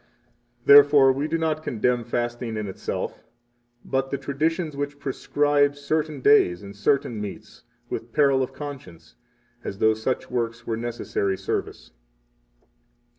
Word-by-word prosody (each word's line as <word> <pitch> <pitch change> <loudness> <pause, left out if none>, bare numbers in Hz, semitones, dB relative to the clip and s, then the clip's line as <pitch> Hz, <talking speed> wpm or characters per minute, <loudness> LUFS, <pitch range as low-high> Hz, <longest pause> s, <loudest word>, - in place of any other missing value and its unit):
Therefore, 140 -1 +8
we 140 +3 -2
do 165 - 0
not 160 -1 -1
condemn 120 -2 0
fasting 120 -1 -3
in 105 - -3
itself, 95 - -5 0.6
but 135 0 -1
the 140 - -2
traditions 155 +4 -2
which 145 0 -4
prescribe 145 +1 +1
certain 150 0 -2
days 100 -10 +4
and 100 0 -10
certain 115 0 0
meats, 105 -1 -9 0.2
with 115 - -6
peril 140 -1 +3
of 130 - -2
conscience, 130 - -9 0.5
as 100 - -5
though 110 +2 +4
such 110 +4 -3
works 115 -1 -2
were 115 - -2
a - - -2
necessary 115 -4 -2
service. - - -4
135 Hz, 135 wpm, -24 LUFS, 115-145 Hz, 0.6 s, Therefore